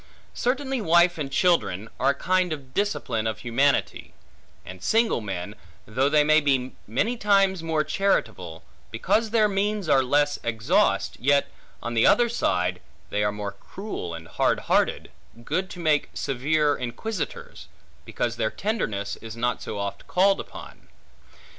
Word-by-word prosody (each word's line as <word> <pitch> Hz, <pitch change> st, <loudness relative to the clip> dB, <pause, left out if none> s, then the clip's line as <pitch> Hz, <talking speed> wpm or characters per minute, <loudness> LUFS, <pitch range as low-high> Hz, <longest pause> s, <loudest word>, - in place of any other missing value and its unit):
Certainly 265 Hz, 0 st, -1 dB
wife 170 Hz, -1 st, +4 dB
and 140 Hz, -2 st, -3 dB
children 125 Hz, -, +1 dB
are 135 Hz, -, +3 dB
a 140 Hz, -, +2 dB
kind 185 Hz, +3 st, +1 dB
of 135 Hz, -4 st, -7 dB
discipline 125 Hz, -, -1 dB
of 110 Hz, -1 st, -2 dB
humanity; 135 Hz, +4 st, 0 dB, 0.5 s
and 95 Hz, 0 st, -10 dB
single 225 Hz, -, +2 dB
men, 95 Hz, -1 st, -5 dB, 0.3 s
though 130 Hz, +6 st, +1 dB
they 150 Hz, 0 st, +4 dB
may 155 Hz, +1 st, +4 dB
be 135 Hz, -3 st, +1 dB, 0.2 s
many 200 Hz, -, 0 dB
times 195 Hz, -4 st, +3 dB
more 160 Hz, -2 st, 0 dB
charitable, 110 Hz, -, -1 dB, 0.3 s
because 215 Hz, -, 0 dB
their 220 Hz, -1 st, +3 dB
means 205 Hz, -1 st, -1 dB
are 135 Hz, -3 st, +5 dB
less 145 Hz, +3 st, +1 dB
exhaust, 115 Hz, -2 st, +1 dB
yet, 140 Hz, +2 st, +2 dB, 0.3 s
on 120 Hz, -, -3 dB
the 115 Hz, -, +4 dB
other 240 Hz, -1 st, +4 dB
side, 90 Hz, -, 0 dB, 0.3 s
they 105 Hz, +1 st, 0 dB
are 105 Hz, -, +1 dB
more 105 Hz, -1 st, -5 dB
cruel 100 Hz, -, -7 dB
and 80 Hz, 0 st, -10 dB
hardhearted -, -, +1 dB, 0.3 s
(good 185 Hz, +8 st, -2 dB
to 180 Hz, -, -9 dB
make 155 Hz, -3 st, +1 dB
severe 145 Hz, +3 st, +1 dB
inquisitors), 160 Hz, -, -5 dB, 0.4 s
because 120 Hz, 0 st, -3 dB
their 110 Hz, -2 st, 0 dB
tenderness 110 Hz, -, -3 dB
is 115 Hz, -1 st, -9 dB
not 120 Hz, 0 st, -1 dB
so 105 Hz, -, -5 dB
oft 100 Hz, 0 st, -5 dB
called 195 Hz, +2 st, +3 dB
upon. -, -, -10 dB
140 Hz, 145 wpm, -25 LUFS, -, 0.5 s, are